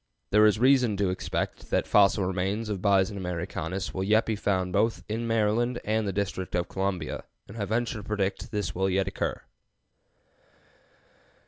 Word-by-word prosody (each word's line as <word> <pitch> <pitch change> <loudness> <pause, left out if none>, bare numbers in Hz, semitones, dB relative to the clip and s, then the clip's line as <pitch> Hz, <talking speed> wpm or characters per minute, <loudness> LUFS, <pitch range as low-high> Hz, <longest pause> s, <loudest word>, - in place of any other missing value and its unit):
There 105 +1 +6
is 105 - +3
reason 125 -3 +4
to 100 -2 +1
expect 90 - -3
that - - +1
fossil 100 -1 +4
remains 95 +4 -1
of 100 -3 -3
Bison 100 0 +2
americanus 90 0 -4
will 95 - -2
yet 110 +3 +3
be 110 - -1
found 95 -3 -1
both 115 +4 +1
in 115 +2 -2
Maryland 115 +2 +1
and 110 0 0
the - - 0
District 95 -1 -3
of 90 0 0
Columbia, 95 -4 -3 0.2
and 100 - -11
I 105 -3 -2
venture 115 +1 -1
to - - -9
predict 100 -1 -1
that - - -9
this 105 -5 -2
will 95 +1 0
yet 95 0 +1
occur. 95 - -3
100 Hz, 175 wpm, -27 LUFS, 95-110 Hz, 0.2 s, There